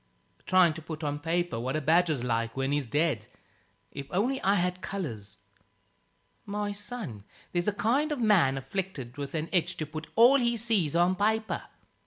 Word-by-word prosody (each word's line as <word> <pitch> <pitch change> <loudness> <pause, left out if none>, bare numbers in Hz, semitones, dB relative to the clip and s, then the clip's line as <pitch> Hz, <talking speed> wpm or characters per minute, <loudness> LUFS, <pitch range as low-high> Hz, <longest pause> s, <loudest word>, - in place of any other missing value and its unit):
"Trying 185 -3 +5
to 160 - -8
put 160 0 -7
on 145 0 -2
paper 165 -4 -1
what 130 +4 -2
a - - +1
badger's 155 -2 +2
like 115 0 -1
when 135 +1 0
he's 145 -3 0
dead. 145 -5 0 0.6
If 140 -1 -7
only 245 +9 0
I 195 +2 +3
had 180 0 0
colours 125 - -5 0.6
" - - -43
"My 205 0 -1
son, 205 - -6 0.3
there's 175 +1 -1
a - - +4
kind 245 +9 +1
of 300 - -1
man 190 - +4
afflicted 140 -5 -4
with 140 +2 -5
an 155 0 -2
itch 175 0 +1
to 155 - -2
put 155 +1 -7
all 245 +5 +7
he 235 -1 +1
sees 210 -9 +1
on 175 +2 +3
paper. 220 +2 0
175 Hz, 180 wpm, -29 LUFS, 145-205 Hz, 0.6 s, all